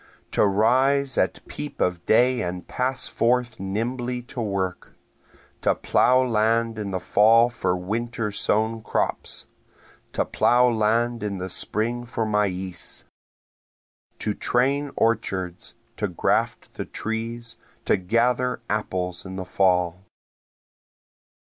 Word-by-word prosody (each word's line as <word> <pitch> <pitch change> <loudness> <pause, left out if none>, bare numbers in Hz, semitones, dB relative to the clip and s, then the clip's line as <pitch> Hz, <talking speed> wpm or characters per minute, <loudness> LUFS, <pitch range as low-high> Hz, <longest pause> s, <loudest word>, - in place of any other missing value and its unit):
To - - +3
rise 130 +7 +3
at - - 0
peep 150 - -6
of 90 -1 0
day 125 +3 +4
and 90 0 -4
pass 130 +1 -1
forth 120 -1 +1
nimbly 120 +5 -2
to 120 0 -6
work, 95 -4 -3 0.7
To - - +2
plough 130 +1 +3
land 115 0 +1
in 105 -2 -3
the 95 -1 -2
fall 115 +5 +5
for 90 -5 0
winter 110 +4 -2
sown 110 +2 +1
crops, - - -1 0.7
To - - +1
plough 125 0 +4
land 115 +2 +1
in 105 -2 -3
the 95 0 -4
spring 115 +6 -2
for 115 -2 -2
maize, 95 -4 -2 1.1
To 105 - -1
train 140 +6 +1
orchards, 100 -3 -1 0.2
to 105 - 0
graft 90 - -1
the - - -5
trees, 115 +1 -4 0.3
to - - +4
gather 120 +6 +1
apples 90 -4 -2
in 95 -1 -7
the 95 -1 -4
fall. 90 -1 +1
110 Hz, 120 wpm, -24 LUFS, 95-120 Hz, 1.1 s, fall